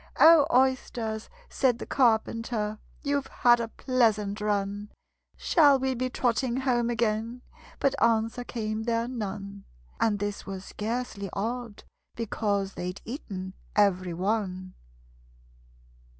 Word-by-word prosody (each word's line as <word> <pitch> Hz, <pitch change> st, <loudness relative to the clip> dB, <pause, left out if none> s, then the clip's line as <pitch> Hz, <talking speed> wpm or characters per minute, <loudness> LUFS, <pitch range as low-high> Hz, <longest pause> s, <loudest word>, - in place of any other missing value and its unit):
"O, 320 Hz, -3 st, +8 dB
Oysters," 245 Hz, -4 st, +1 dB, 0.2 s
said 255 Hz, -4 st, +1 dB
the -, -, -6 dB
Carpenter, 225 Hz, -3 st, +1 dB, 0.2 s
"You've 280 Hz, -1 st, 0 dB
had 240 Hz, -1 st, +4 dB
a 230 Hz, -, -2 dB
pleasant 220 Hz, -5 st, +1 dB
run! 205 Hz, 0 st, -1 dB, 0.5 s
Shall 290 Hz, -5 st, +5 dB
we 265 Hz, 0 st, 0 dB
be 255 Hz, +1 st, -2 dB
trotting 250 Hz, +1 st, 0 dB
home 240 Hz, -3 st, +1 dB
again?" 230 Hz, +1 st, -1 dB, 0.4 s
But 275 Hz, -, +2 dB
answer 230 Hz, +1 st, +2 dB
came 220 Hz, -2 st, -3 dB
there 230 Hz, 0 st, 0 dB
none 200 Hz, -4 st, -5 dB, 0.3 s
And 215 Hz, -2 st, +2 dB
this 205 Hz, 0 st, -3 dB
was 195 Hz, -1 st, -7 dB
scarcely 215 Hz, -2 st, -4 dB
odd, 230 Hz, +1 st, -4 dB, 0.3 s
because 200 Hz, -3 st, -1 dB
They'd 180 Hz, +2 st, -5 dB
eaten 190 Hz, -, -6 dB, 0.2 s
every 185 Hz, -4 st, +2 dB
one. 185 Hz, -1 st, -2 dB
225 Hz, 115 wpm, -28 LUFS, 205-245 Hz, 0.5 s, O